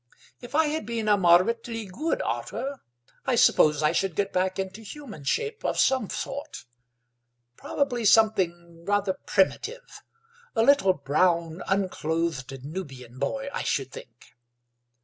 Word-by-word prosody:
If 245 Hz, +3 st, -8 dB
I 320 Hz, +1 st, +4 dB
had 300 Hz, -6 st, -2 dB
been 230 Hz, -2 st, -2 dB
a 210 Hz, -, +5 dB
moderately 220 Hz, +5 st, +2 dB
good 285 Hz, -, -2 dB
otter 275 Hz, 0 st, -4 dB, 0.5 s
I 260 Hz, -, +3 dB
suppose 150 Hz, -9 st, +4 dB
I 150 Hz, -, +4 dB
should 195 Hz, -4 st, -1 dB
get 200 Hz, -1 st, -1 dB
back 185 Hz, 0 st, 0 dB
into 190 Hz, +2 st, -4 dB
human 220 Hz, -, -10 dB
shape 440 Hz, -, -1 dB
of -, -, -1 dB
some 260 Hz, -6 st, +2 dB
sort; 275 Hz, -, -6 dB, 0.9 s
probably 245 Hz, -, -2 dB
something 175 Hz, -6 st, +2 dB
rather 205 Hz, 0 st, +1 dB
primitive—a 460 Hz, -, -2 dB
little 280 Hz, -7 st, +5 dB
brown, 165 Hz, +3 st, +1 dB
unclothed 160 Hz, -8 st, -2 dB
Nubian 135 Hz, -7 st, -8 dB
boy, 275 Hz, -, -2 dB
I -, -, -2 dB
should 135 Hz, -1 st, -1 dB
think." 120 Hz, 0 st, -13 dB
195 Hz, 130 wpm, -26 LUFS, 165-260 Hz, 0.9 s, a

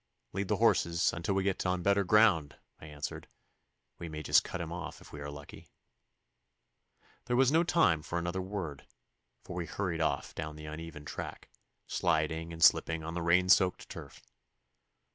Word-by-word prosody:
'Lead 100 Hz, +1 st, -2 dB
the -, -, +1 dB
horses 85 Hz, 0 st, +3 dB
until 90 Hz, +3 st, -2 dB
we 95 Hz, -, +1 dB
get 95 Hz, -1 st, 0 dB
on 90 Hz, -1 st, -1 dB
better 100 Hz, +1 st, +3 dB
ground,' 95 Hz, -7 st, +4 dB, 0.2 s
I 80 Hz, -, -11 dB
answered. 75 Hz, -1 st, -6 dB, 0.7 s
'We 85 Hz, -, -6 dB
may 75 Hz, 0 st, -6 dB
just -, -, +5 dB
cut 95 Hz, -, -5 dB
him 85 Hz, -1 st, -5 dB
off 85 Hz, -1 st, -6 dB
if -, -, -15 dB
we 75 Hz, -, -7 dB
are 70 Hz, -, -5 dB
lucky.' 70 Hz, 0 st, -11 dB, 1.6 s
There 120 Hz, +1 st, 0 dB
was 130 Hz, +1 st, +4 dB
no 165 Hz, +2 st, +4 dB
time 160 Hz, -, +3 dB
for 85 Hz, -, -4 dB
another 85 Hz, +2 st, -2 dB
word, 95 Hz, -7 st, -5 dB, 0.6 s
for 90 Hz, -, -8 dB
we 85 Hz, -2 st, -3 dB
hurried 85 Hz, -1 st, -2 dB
off 80 Hz, -, -1 dB
down 75 Hz, -1 st, -5 dB
the 75 Hz, 0 st, -9 dB
uneven 75 Hz, 0 st, -8 dB
track, -, -, -7 dB, 0.4 s
sliding 80 Hz, -1 st, 0 dB
and 80 Hz, 0 st, -3 dB
slipping 80 Hz, -1 st, +4 dB
on 80 Hz, +1 st, -5 dB
the 85 Hz, -, -3 dB
rain 90 Hz, +2 st, +3 dB
soaked 90 Hz, 0 st, +3 dB
turf. -, -, -10 dB
85 Hz, 175 wpm, -31 LUFS, 80-95 Hz, 1.6 s, just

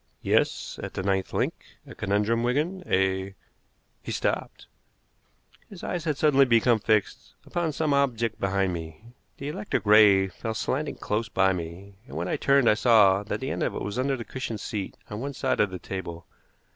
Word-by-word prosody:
"Yes, -, -, 0 dB
at -, -, -7 dB
the 95 Hz, -, -3 dB
ninth 95 Hz, -1 st, 0 dB
link. -, -, 0 dB, 0.3 s
A -, -, -11 dB
conundrum, 105 Hz, +3 st, 0 dB
Wigan. 150 Hz, +10 st, 0 dB
A 95 Hz, +1 st, 0 dB, 0.3 s
" -, -, -43 dB
He -, -, -6 dB
stopped. -, -, -2 dB, 1.0 s
His 195 Hz, -4 st, -11 dB
eyes 175 Hz, -2 st, -3 dB
had 150 Hz, -4 st, 0 dB
suddenly 140 Hz, -3 st, +5 dB
become 115 Hz, -1 st, +4 dB
fixed 105 Hz, -1 st, -1 dB
upon 175 Hz, -2 st, -1 dB
some 150 Hz, 0 st, 0 dB
object 120 Hz, -5 st, 0 dB
behind 95 Hz, -1 st, 0 dB
me. 80 Hz, +2 st, -7 dB, 0.3 s
The 140 Hz, -, -5 dB
electric 110 Hz, -6 st, -3 dB
ray 105 Hz, -2 st, +6 dB
fell 110 Hz, +4 st, -5 dB
slanting 140 Hz, +7 st, -2 dB
close 105 Hz, +2 st, -2 dB
by 95 Hz, -2 st, +3 dB
me, 90 Hz, +3 st, -7 dB
and 70 Hz, -, -8 dB
when 85 Hz, +2 st, -2 dB
I -, -, 0 dB
turned 140 Hz, -3 st, +3 dB
I -, -, +7 dB
saw 105 Hz, -4 st, +5 dB
that 105 Hz, -, -4 dB
the -, -, -3 dB
end -, -, -3 dB
of -, -, -1 dB
it -, -, -4 dB
was 105 Hz, +4 st, -3 dB
under 135 Hz, +1 st, 0 dB
the 115 Hz, -, -7 dB
cushioned 125 Hz, -5 st, -5 dB
seat 100 Hz, -3 st, -5 dB
on 105 Hz, -, -4 dB
one 140 Hz, +3 st, -4 dB
side 130 Hz, 0 st, -1 dB
of 105 Hz, -, +3 dB
the 90 Hz, -, -6 dB
table. 85 Hz, -3 st, -6 dB
110 Hz, 190 wpm, -26 LUFS, 95-135 Hz, 1.0 s, I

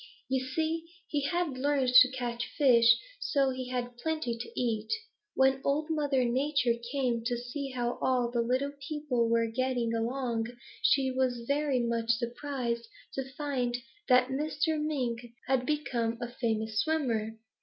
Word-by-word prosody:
You 260 Hz, -1 st, +1 dB
see, 320 Hz, +5 st, -1 dB, 0.2 s
he 290 Hz, -, -1 dB
had 345 Hz, -6 st, -1 dB
learned 275 Hz, -2 st, +2 dB
to 255 Hz, +1 st, +9 dB
catch 245 Hz, -2 st, -3 dB
fish, 245 Hz, -5 st, +5 dB
and 230 Hz, -, +5 dB, 0.2 s
so 280 Hz, -, +2 dB
he 255 Hz, -1 st, -5 dB
had 245 Hz, -1 st, -3 dB
plenty 310 Hz, -5 st, -1 dB
to 235 Hz, +1 st, -6 dB
eat. 225 Hz, -3 st, -1 dB, 0.4 s
When 265 Hz, 0 st, +3 dB
Old 300 Hz, +3 st, 0 dB
Mother 285 Hz, -5 st, +1 dB
Nature 255 Hz, 0 st, +2 dB, 0.2 s
came 250 Hz, -5 st, 0 dB
to 240 Hz, 0 st, 0 dB
see 255 Hz, +4 st, -5 dB
how 245 Hz, -2 st, -2 dB
all 250 Hz, -2 st, +2 dB
the 240 Hz, -1 st, +1 dB
little 255 Hz, +4 st, 0 dB, 0.2 s
people 280 Hz, -7 st, 0 dB
were 230 Hz, 0 st, +3 dB
getting 240 Hz, 0 st, -1 dB
along, 230 Hz, 0 st, -1 dB, 0.3 s
she 265 Hz, -1 st, +3 dB
was 255 Hz, -2 st, 0 dB
very 280 Hz, -3 st, +1 dB
much 230 Hz, -1 st, -1 dB
surprised 235 Hz, 0 st, -1 dB, 0.3 s
to 265 Hz, 0 st, -4 dB
find 255 Hz, -5 st, -1 dB, 0.3 s
that 250 Hz, 0 st, +5 dB
Mr. 300 Hz, +2 st, 0 dB
Mink 255 Hz, -7 st, -1 dB, 0.2 s
had 255 Hz, -1 st, +1 dB
become 240 Hz, -7 st, 0 dB
a 240 Hz, -1 st, -4 dB
famous 220 Hz, -2 st, -1 dB
swimmer. 225 Hz, -7 st, 0 dB
255 Hz, 155 wpm, -30 LUFS, 235-280 Hz, 0.4 s, to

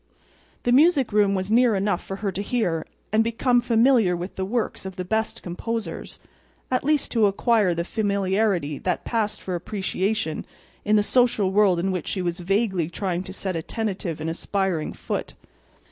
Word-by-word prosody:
The 245 Hz, -, +1 dB
music 280 Hz, -3 st, +4 dB
room 205 Hz, -1 st, +4 dB
was 190 Hz, +2 st, -2 dB
near 235 Hz, -1 st, +4 dB
enough 195 Hz, -2 st, 0 dB
for 195 Hz, -, -5 dB
her 195 Hz, -, +1 dB
to 190 Hz, -, -4 dB
hear 200 Hz, -7 st, -1 dB, 0.3 s
and 220 Hz, +1 st, +5 dB
become 240 Hz, +2 st, +2 dB
familiar 230 Hz, -5 st, +4 dB
with 180 Hz, +2 st, -6 dB
the 190 Hz, -, -2 dB
works 230 Hz, +3 st, -2 dB
of 190 Hz, -1 st, -7 dB
the 185 Hz, -, -4 dB
best 220 Hz, +3 st, -1 dB
composers—at 230 Hz, +5 st, -5 dB
least 300 Hz, 0 st, +1 dB
to 225 Hz, -3 st, +4 dB
acquire 200 Hz, -2 st, +2 dB
the 170 Hz, -, -1 dB
familiarity 195 Hz, -, 0 dB
that 180 Hz, -2 st, -2 dB
passed 220 Hz, -3 st, -1 dB
for 185 Hz, -, -4 dB
appreciation 190 Hz, -1 st, -2 dB, 0.4 s
in 210 Hz, 0 st, +3 dB
the 210 Hz, -, +4 dB
social 230 Hz, -5 st, +2 dB
world 195 Hz, -3 st, +4 dB
in 185 Hz, +3 st, 0 dB
which 180 Hz, -2 st, -3 dB
she 185 Hz, -, -2 dB
was 175 Hz, 0 st, -2 dB
vaguely 190 Hz, -2 st, 0 dB
trying 180 Hz, 0 st, -2 dB
to 190 Hz, -, -7 dB
set 190 Hz, -1 st, -4 dB
a 165 Hz, -, -1 dB
tentative 190 Hz, -5 st, -3 dB
and 155 Hz, -, -4 dB
aspiring 185 Hz, -2 st, -1 dB
foot. -, -, -5 dB
200 Hz, 175 wpm, -24 LUFS, 180-225 Hz, 0.4 s, and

